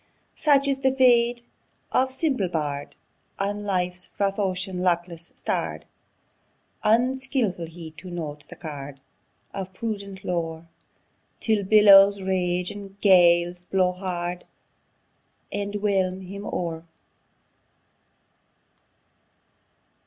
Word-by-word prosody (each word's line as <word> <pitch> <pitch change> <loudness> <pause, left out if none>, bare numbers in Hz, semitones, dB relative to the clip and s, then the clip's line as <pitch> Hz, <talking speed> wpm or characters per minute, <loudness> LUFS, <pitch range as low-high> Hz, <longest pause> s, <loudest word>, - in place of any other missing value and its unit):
Such 285 -2 +4
is 275 -1 +1
the 265 -1 +1
fate 240 -2 +4 0.5
of 260 0 +2
simple 265 - 0
bard, 145 -4 -3 0.4
On 205 +1 -2
life's 180 -2 -2
rough 195 0 0
ocean 190 -1 -1
luckless 175 -2 -1
starr'd! - - -3 1.0
Unskilful 240 - +1
he 165 -1 -10
to 180 +2 -9
note 155 -4 -6
the - - -9
card 145 -3 -8 0.5
Of 190 -1 -6
prudent 200 -3 -5
lore, 165 -2 -3 0.7
Till 220 -3 +1
billows 200 -1 +7
rage, 180 -1 0
and 200 -1 -10
gales 175 -2 +4
blow 185 -1 +2
hard, 180 -1 -4 1.1
And 205 0 -3
whelm 190 -2 0
him 200 +2 -8
o'er! 165 -1 -4
190 Hz, 100 wpm, -25 LUFS, 175-205 Hz, 1.1 s, billows